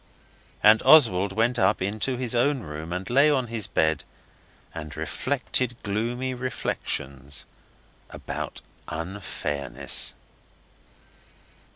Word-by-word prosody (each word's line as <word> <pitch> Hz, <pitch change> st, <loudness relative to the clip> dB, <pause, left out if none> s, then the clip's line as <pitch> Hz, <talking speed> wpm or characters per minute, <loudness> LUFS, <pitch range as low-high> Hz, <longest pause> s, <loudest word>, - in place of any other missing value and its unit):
And 110 Hz, +1 st, +7 dB
Oswald 100 Hz, -11 st, +6 dB
went 115 Hz, +4 st, +1 dB
up 95 Hz, 0 st, +3 dB
into 110 Hz, +7 st, -1 dB
his 125 Hz, -2 st, -1 dB
own 130 Hz, +3 st, +2 dB
room 75 Hz, -1 st, -7 dB
and 90 Hz, +1 st, -3 dB
lay 140 Hz, +5 st, +5 dB
on 135 Hz, -4 st, +2 dB
his 110 Hz, -4 st, -1 dB
bed, 80 Hz, -3 st, +1 dB, 0.7 s
and 75 Hz, -2 st, -7 dB
reflected 125 Hz, -, -1 dB
gloomy 120 Hz, +5 st, -1 dB
reflections 70 Hz, -, -3 dB, 0.6 s
about -, -, -6 dB, 0.3 s
unfairness. 75 Hz, -6 st, -3 dB
105 Hz, 95 wpm, -26 LUFS, 80-125 Hz, 0.7 s, And